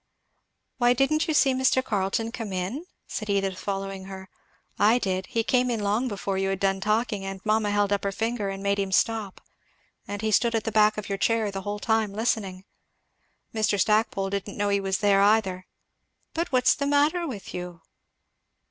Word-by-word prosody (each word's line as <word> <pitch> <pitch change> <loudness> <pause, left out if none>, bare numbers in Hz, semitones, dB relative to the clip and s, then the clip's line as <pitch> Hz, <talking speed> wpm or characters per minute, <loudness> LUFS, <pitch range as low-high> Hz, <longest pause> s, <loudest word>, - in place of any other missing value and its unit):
"Why, 240 0 +5
didn't 275 +5 +1
you 315 - 0
see 270 -2 +4
Mr. 260 0 +2
Carleton 215 +1 -1
come 225 -4 -5
in?" 195 - -4 0.2
said 215 -2 -5
Edith 195 -2 0
following 195 -1 -4
her; 190 -1 -9 0.5
"I 215 +4 +5
did 190 -5 -2
he 230 - -1
came 250 +1 +2
in 235 -2 -1
long 210 +5 0
before 195 -3 -3
you 195 0 0
had 195 -1 -2
done 195 0 0
talking, 210 0 0
and 195 0 -5
mamma 215 -1 +2
held 205 0 +1
up 200 - -1
her 200 - 0
finger 225 0 -2
and 195 0 -6
made 200 0 +1
him 195 -1 -1
stop; 215 -1 0 0.7
and 205 +1 -5
he 220 - 0
stood 235 +2 +3
at 225 - 0
the 225 - -2
back 215 0 +4
of 210 - -5
your 195 -1 -3
chair 225 -1 +1
the 195 0 -5
whole 205 +2 -4
time 220 -1 0
listening. 200 -4 -2 0.9
Mr. 215 -2 +1
Stackpole 210 -2 +1
didn't 200 +1 -4
know 205 0 0
he 200 0 +2
was 195 0 -1
there, 200 -1 +4
either. 200 -3 +2 0.7
But 335 0 -2
what's 255 -1 +4
the 280 - -2
matter 295 +4 +2
with 215 -9 -7
you?" 175 -1 -6
205 Hz, 190 wpm, -26 LUFS, 195-230 Hz, 0.9 s, Why